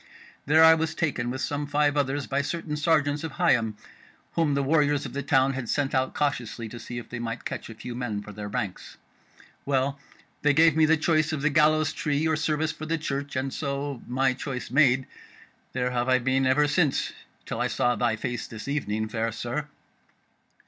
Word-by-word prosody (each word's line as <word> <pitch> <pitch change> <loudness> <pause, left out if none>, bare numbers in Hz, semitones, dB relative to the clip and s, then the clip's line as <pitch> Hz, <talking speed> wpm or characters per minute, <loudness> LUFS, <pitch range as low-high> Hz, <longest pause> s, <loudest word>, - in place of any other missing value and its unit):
There 155 +3 +6
was 160 0 -2
I - - -26
taken 125 -7 0
with 130 +2 -4
some 145 0 -2
five 145 0 +2
others 145 -1 0
by 140 +1 0
certain 155 +1 -3
sergeants 150 -1 +1
of 160 -3 -5
Higham, 115 -5 +2 0.6
whom 160 -4 +1
the 140 - +1
warriors 145 0 +2
of - - -7
the 140 - -2
town 135 -1 +3
had 130 -3 -5
sent 145 -1 0
out 130 -1 0
cautiously 120 -5 -2
to 120 - -8
see 120 +1 -7
if 120 - -6
they 120 - -6
might 115 -1 -5
catch - - -5
a 115 - -9
few 120 +3 -7
men 115 -4 -3
for 105 - -9
their 105 0 -6
ranks. 100 -2 -5 0.7
Well, 140 0 0 0.4
they 150 -1 +4
gave 160 0 +5
me 160 -1 +4
the 160 +1 +4
choice 155 -1 +2
of 150 -3 -3
the 155 - +3
gallows 155 +1 +3
tree 150 +1 0
or 160 - +2
service 155 0 0
for 155 0 -8
the 165 +1 0
Church, 140 -2 -4
and 130 +1 -2
so, 140 -2 -3
my 130 +1 +2
choice 130 -2 -5
made, 130 -2 +4 0.7
there 125 -1 -1
have 120 0 0
I 130 - +5
been 130 +1 +1
ever 145 +3 +4
since, 145 -2 +1 0.3
till - - -3
I - - +2
saw 120 0 +1
thy 120 -2 +1
face 120 +2 -4
this 115 +2 -9
evening, 110 -7 -1
fair 115 +1 -2
sir." 120 +6 -4
140 Hz, 205 wpm, -26 LUFS, 125-150 Hz, 0.7 s, There